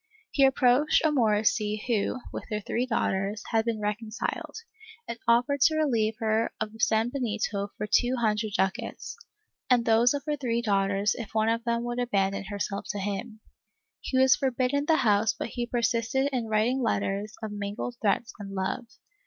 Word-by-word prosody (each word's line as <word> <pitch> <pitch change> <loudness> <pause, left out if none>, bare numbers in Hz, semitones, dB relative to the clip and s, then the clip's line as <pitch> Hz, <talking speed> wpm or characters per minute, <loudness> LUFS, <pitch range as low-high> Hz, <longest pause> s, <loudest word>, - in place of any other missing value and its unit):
He 275 - +4
approached 265 +4 +3
a - - +5
Morisca 215 -4 +2
who, 235 +1 0
with - - -5
her 210 -2 -1
three 235 +4 -2
daughters, 205 -2 -1
had 225 -1 +2
been 230 -2 -1
reconciled, 210 +1 -3 0.5
and 235 - -5
offered 245 +4 +3
to 315 +4 +5
relieve 230 -8 +1
her 220 0 0
of 220 -1 -3
her 220 - -14
sanbenito 220 -3 0
for - - -2
two 245 +4 +2
hundred 215 -3 0
clucats, 190 0 -2 0.5
and 245 -2 +4
those 230 +4 +4
of 280 - -4
her 300 -1 0
three 235 -3 -1
daughters 200 -1 +1
if 225 -3 -8
one 220 0 +3
of 230 +1 0
them 235 0 0
would 240 0 -3
abandon 195 -5 0
herself 200 0 -4
to - - -2
him. 205 +3 -4 0.6
He 260 - -2
was 260 0 +6
forbidden 265 +2 0
the 320 - +5
house 215 -4 +3
but - - -4
he 240 0 -3
persisted 240 +3 0
in 240 -3 -1
writing 220 +5 +1
letters 205 -2 -1
of 215 - -4
mingled 205 +4 -4
threats 220 +2 0
and 195 -1 -7
love. 190 +6 -2
225 Hz, 170 wpm, -27 LUFS, 210-245 Hz, 0.6 s, was